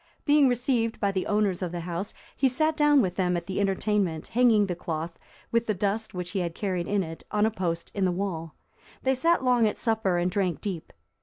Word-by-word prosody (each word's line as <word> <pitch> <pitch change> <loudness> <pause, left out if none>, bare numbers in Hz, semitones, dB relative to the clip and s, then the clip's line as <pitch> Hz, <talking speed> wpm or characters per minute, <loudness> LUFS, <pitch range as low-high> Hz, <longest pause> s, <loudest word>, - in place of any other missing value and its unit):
Being 290 -1 +5
received 245 -2 0
by 200 -1 +1
the 190 -1 -2
owners 205 -3 +1
of 180 -2 -2
the 175 -1 -4
house, 175 +4 -4 0.2
he 265 - +3
sat 310 +5 +1
down 295 -3 +4
with 180 -2 -1
them 180 -2 +1
at 170 - -5
the 190 - -3
entertainment, 195 -4 0
hanging 230 -3 +4
the 185 - -2
cloth, 165 0 -5 0.3
with 230 0 +1
the 215 - +1
dust 205 +2 -2
which 180 0 -4
he 200 - -1
had 170 -2 -3
carried 185 -4 -2
in 200 -1 +1
it, 165 -1 -8
on 210 0 +2
a 220 - +1
post 170 -5 -3
in 200 -2 0
the 180 - +2
wall. 175 -4 -4 0.5
They 265 - +3
sat 330 +3 +2
long 245 -3 +4
at 210 - -2
supper 220 -6 +1
and 175 +1 0
drank 185 -6 0
deep. 185 -6 -5
200 Hz, 225 wpm, -27 LUFS, 180-230 Hz, 0.5 s, Being